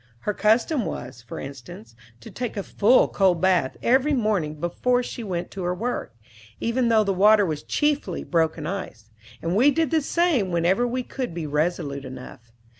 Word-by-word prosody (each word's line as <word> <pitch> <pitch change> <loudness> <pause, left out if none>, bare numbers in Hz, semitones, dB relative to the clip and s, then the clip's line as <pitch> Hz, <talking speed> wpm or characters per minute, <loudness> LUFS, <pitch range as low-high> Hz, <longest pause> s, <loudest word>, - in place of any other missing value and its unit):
Her 210 - -1
custom 230 +7 +2
was, 125 - -6
for 120 - -8
instance, 120 -4 -10 0.3
to - - -11
take 245 -3 -5
a 200 - -2
full 225 +7 +4
cold 185 -4 +2
bath 180 -7 +1
every 270 +4 +3
morning 205 - 0
before 245 +9 0
she 240 - -6
went 175 -4 -4
to 195 - -6
her 180 0 -1
work, 230 - -4 0.4
even 235 +1 0
though 220 -1 +4
the 200 -1 0
water 205 +2 +5
was 155 -4 -3
chiefly 295 -1 -1
broken 160 -2 0
ice; 155 - -6 0.3
and 170 +2 -1
we 250 +7 +5
did 315 0 0
the 320 - +3
same 300 - +1
whenever 180 +7 +2
we 250 +1 -2
could 245 -8 -5
be 170 -2 -4
resolute 150 -2 -1
enough. 125 -2 -10
195 Hz, 180 wpm, -24 LUFS, 160-245 Hz, 0.4 s, water